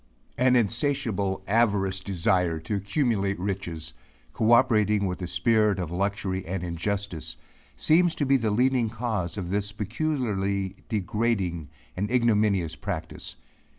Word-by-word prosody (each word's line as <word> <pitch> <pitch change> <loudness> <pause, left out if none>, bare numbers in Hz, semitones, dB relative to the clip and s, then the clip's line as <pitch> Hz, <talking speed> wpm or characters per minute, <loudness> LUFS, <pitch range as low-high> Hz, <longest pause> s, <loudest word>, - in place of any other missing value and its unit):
An 125 0 +4
insatiable, 115 -5 0
avaricious 100 -4 +2
desire 90 -3 +1
to 80 - -4
accumulate 100 -1 0
riches, 85 -5 -4 0.4
cooperating 110 -3 +4
with 90 0 -3
a 90 - -3
spirit 105 0 +2
of 90 -4 -3
luxury 95 0 -1
and 90 +1 -4
injustice, 90 0 -3 0.4
seems 165 - +3
to 145 - 0
be 135 +1 +4
the 115 -3 0
leading 125 +1 +2
cause 110 -6 -3
of 90 -3 -4
this 100 0 -1
peculiarly 100 -5 -1
degrading 100 -6 -1 0.3
and 100 +3 -2
ignominious 105 -9 +2
practice. 70 - -5
100 Hz, 120 wpm, -26 LUFS, 95-115 Hz, 0.4 s, An